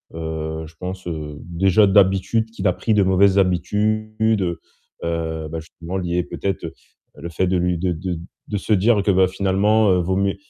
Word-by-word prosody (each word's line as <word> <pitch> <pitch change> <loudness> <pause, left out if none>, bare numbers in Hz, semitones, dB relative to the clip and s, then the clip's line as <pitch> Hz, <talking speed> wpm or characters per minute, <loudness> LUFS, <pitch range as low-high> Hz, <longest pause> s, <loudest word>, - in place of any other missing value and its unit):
heu, 80 -1 -4
je 80 - -17
pense, 90 +2 -7
heu, 75 -3 -5
déjà 95 +4 +2
d'habitude, 95 +3 +3
qu'il 115 - -2
a 90 - +3
pris 110 - -1
de 105 -1 +4
mauvaises 95 +1 +4
habitudes, 105 +4 0 0.2
heu, 85 -2 -2 0.5
heu, 80 -1 -3
bah, 80 +1 -5
justement 85 +3 -7
lié 90 -1 -1
peut-être, 95 0 -4
heu, 80 - -6 0.4
le 80 +4 -7
fait 90 +3 0
de 95 - +1
lui 90 0 0
de 90 +1 -1
de 85 +1 -4 0.3
de 105 - -1
se 110 - 0
dire 105 +2 +3
que, 100 - +3
bah, 95 0 +4
finalement, 100 +3 +2
heu, 90 - +3
vaut 95 +2 0
mieux 100 0 +1
95 Hz, 195 wpm, -21 LUFS, 85-100 Hz, 0.5 s, de